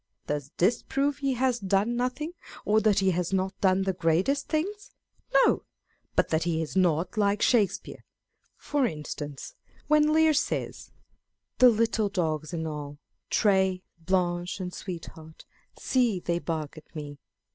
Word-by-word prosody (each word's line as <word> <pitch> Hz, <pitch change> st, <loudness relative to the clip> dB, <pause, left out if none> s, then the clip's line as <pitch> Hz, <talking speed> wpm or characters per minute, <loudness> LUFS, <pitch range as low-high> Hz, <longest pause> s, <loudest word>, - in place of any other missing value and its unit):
Does 145 Hz, -1 st, -3 dB
this 200 Hz, +7 st, +2 dB
prove 280 Hz, +1 st, -1 dB
he 275 Hz, -2 st, 0 dB
has 250 Hz, -1 st, +1 dB
done 200 Hz, +4 st, +1 dB
nothing, 255 Hz, +6 st, -2 dB, 0.3 s
or 215 Hz, +1 st, +3 dB
that 215 Hz, -2 st, +3 dB
he 190 Hz, -1 st, +3 dB
has 175 Hz, 0 st, -1 dB
not 190 Hz, 0 st, 0 dB
done 190 Hz, 0 st, +3 dB
the 190 Hz, 0 st, 0 dB
greatest 180 Hz, -, +1 dB
things? 395 Hz, +7 st, -2 dB, 0.4 s
No, -, -, +4 dB, 0.5 s
but -, -, +2 dB
that 160 Hz, 0 st, +1 dB
he 170 Hz, -1 st, 0 dB
is 160 Hz, +1 st, -4 dB
not 175 Hz, 0 st, +1 dB
like 205 Hz, 0 st, +2 dB
Shakespeare. 220 Hz, -6 st, +1 dB, 0.5 s
For 285 Hz, -4 st, 0 dB
instance, 150 Hz, -4 st, -6 dB, 0.3 s
when 300 Hz, 0 st, +4 dB
Lear 315 Hz, 0 st, +4 dB
says, 295 Hz, -, -2 dB, 0.4 s
" -, -, -57 dB
The 255 Hz, -, +9 dB
little 225 Hz, -2 st, +1 dB
dogs 160 Hz, -5 st, -2 dB
and 160 Hz, -2 st, -3 dB
all, 145 Hz, -2 st, -6 dB, 0.3 s
Tray, 190 Hz, -3 st, +2 dB, 0.2 s
Blanche, 175 Hz, +1 st, -1 dB
and 180 Hz, -1 st, -5 dB
Sweetheart, 165 Hz, -4 st, -9 dB, 0.3 s
see 240 Hz, -7 st, +1 dB
they 170 Hz, -1 st, -1 dB
bark 160 Hz, -2 st, -4 dB
at 155 Hz, -, -26 dB
me 145 Hz, -2 st, -7 dB
190 Hz, 150 wpm, -27 LUFS, 165-240 Hz, 0.5 s, The